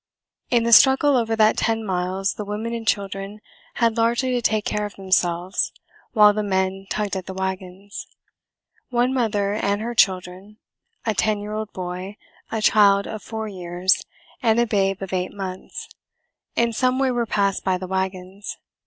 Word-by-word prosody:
In 240 -2 +3
the 235 0 +3
struggle 270 +3 +7
over 225 -2 +1
that 215 -1 +4
ten 225 0 0
miles 185 0 -1
the 210 - -5
women 210 +3 -4
and 230 -1 -5
children 195 +1 -2 0.4
had 230 -1 +1
largely 235 +3 +2
to 245 -1 0
take 215 -2 +1
care 210 0 -1
of 205 - -14
themselves 185 -1 0 0.4
while 210 -2 +7
the 215 - -1
men 190 -1 -1
tugged 210 -2 -2
at 190 -2 -5
the 190 - -6
wagons. 190 +1 -5 0.8
One 245 +1 +1
mother 205 -5 0
and 205 -1 0
her 235 +2 -3
children, 190 0 0 0.5
a 220 - +1
ten 210 +1 +1
year 210 +1 -6
old 215 0 -4
boy, 185 +2 -6 0.3
a 220 -1 -2
child 200 -2 +5
of 215 -1 -6
four 220 -1 -5
years, 180 -1 0 0.4
and 230 -2 +3
a 240 - +4
babe 195 -3 0
of 190 - -6
eight 180 0 -2
months, 190 -2 -6 0.7
in 235 0 +2
some 255 +2 +1
way 265 -1 +2
were 240 -2 -1
passed 200 -2 0
by 185 -1 +1
the 185 - -6
wagons. 190 +1 -4
205 Hz, 170 wpm, -23 LUFS, 190-225 Hz, 0.8 s, struggle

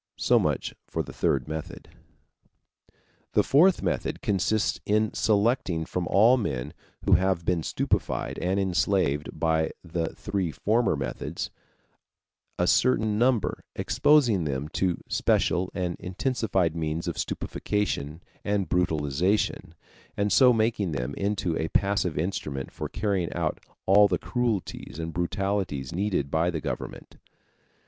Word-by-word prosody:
So - - +4
much - - -1
for - - -2
the - - -10
third 65 -3 0
method. 80 0 -6 1.4
The - - +4
fourth 175 +6 +4
method - - -2
consists 100 +2 +1
in 110 +1 +1
selecting 105 -6 +1
from 90 0 -3
all 115 +9 +5
the - - -1
men 65 -9 -3 0.3
who - - +1
have 95 -2 +3
been 90 -2 +1
stupefied - - -1
and 95 +2 0
enslaved 90 -5 +1
by 80 0 +1
the 85 -1 -3
three 95 -4 -2
former 110 +4 +1
methods 65 -4 -4 1.1
a - - +2
certain 110 -4 +2
number, 120 -5 +1
exposing 120 - +3
them 70 +1 -3
to 90 0 0
special 90 +1 +1
and 90 -2 -2
intensified 95 -3 -1
means 80 0 -2
of - - -3
stupefaction 85 -6 -2 0.2
and 100 -2 0
brutalization, 85 +1 0 0.4
and 100 -1 +1
so 125 +4 +7
making 110 -6 +1
them 65 0 -3
into 100 -3 -1
a 80 - -1
passive 100 -4 +1
instrument 75 -5 -3
for - - -5
carrying 100 -5 -1
out 85 -3 -1 0.3
all 100 +2 +6
the 90 -3 0
cruelties 115 - -3
and 80 0 -4
brutalities 90 -6 -2
needed 90 -7 -1
by 80 +2 +2
the 85 -3 -2
government. - - -6
90 Hz, 130 wpm, -26 LUFS, 80-105 Hz, 1.4 s, so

